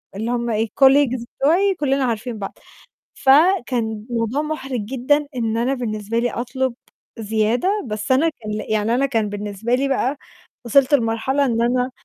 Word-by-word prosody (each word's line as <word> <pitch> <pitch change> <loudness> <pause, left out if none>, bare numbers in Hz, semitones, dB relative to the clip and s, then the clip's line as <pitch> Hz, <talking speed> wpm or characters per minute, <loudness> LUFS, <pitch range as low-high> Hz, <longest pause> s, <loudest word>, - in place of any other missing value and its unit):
اللي 225 +4 -3
هم 235 -1 -1
إيه، 220 +1 0
colleagues 265 -3 +4
بتاعي 370 +7 +3
كُلّنا 275 -2 +1
عارفين 230 0 -3
بعض. 195 - -7 0.6
فكان 255 - +2
الموضوع 235 +4 -1
مُحرِج 270 -6 -4
جدًا 270 +5 0
إن 225 -2 -1
أنا 250 +4 +1
بالنسبة 220 -3 -3
لي 240 -1 0
أطلب 255 +1 -2 0.5
زيادة، 220 - 0 0.2
بس 215 +2 -3
أنا 295 +6 +4
كان 225 -8 -9 0.2
يعني 220 +2 +1
أنا 275 - +2
كان 225 -6 0
بالنسبة 205 +3 -2
لي 275 +2 0
بقى 270 +1 0 0.5
وصلت 275 +4 +3
لمرحلة 260 +3 +1
إن 230 -2 0
أنا 250 +2 +1
245 Hz, 155 wpm, -21 LUFS, 225-270 Hz, 0.6 s, colleagues